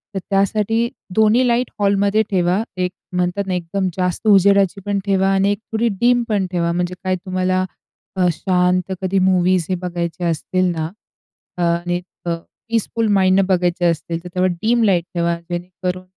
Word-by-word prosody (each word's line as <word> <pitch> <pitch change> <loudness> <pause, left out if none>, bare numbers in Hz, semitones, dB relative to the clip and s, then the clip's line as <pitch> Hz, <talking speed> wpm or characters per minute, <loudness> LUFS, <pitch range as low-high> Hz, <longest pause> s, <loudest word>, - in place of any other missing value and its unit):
तर - - 0
त्यासाठी 210 +4 +1 0.3
2न्ही 220 +4 +4
लाइट 240 +1 +1
हॉलमध्ये 200 +1 +2
ठेवा 185 +2 +1
1 180 0 0 0.2
म्हणतात 180 +3 0
ना, 185 - -1
एकदम 180 +2 -2
जास्त 180 +3 -1
उजेडाचीपण 200 0 +3
ठेवा 195 -1 +2
आणि 195 +1 +2
1 205 - -1
थोडी 225 +1 +1
डीम 245 0 +4
पण 200 -3 +1
ठेवा, 170 -2 0
म्हणजे 180 +1 -2
काय 185 0 +1
तुम्हाला 185 0 -1 0.5
अ, 185 - +2
शांत 180 +1 +1
कधी 190 +1 +1
मूवीज 185 -2 +3
हे 185 - +1
बघायचे 170 -1 -4
असतील 170 +3 0
ना 160 -1 -2 0.8
आणि 175 +1 0 0.2
अ, 170 -1 0 0.3
पीसफुल 230 0 0
माइंडनं 190 0 +4
बघायचे 180 -2 +1
असतील, 165 0 -1
तर 180 - -8
तेव्हा 185 0 +3
डीम 230 +2 +2
लाईट 185 -5 +3
ठेवा. 170 -1 0 0.2
जेणेकरून 180 +1 -4
185 Hz, 155 wpm, -19 LUFS, 175-200 Hz, 0.8 s, 2न्ही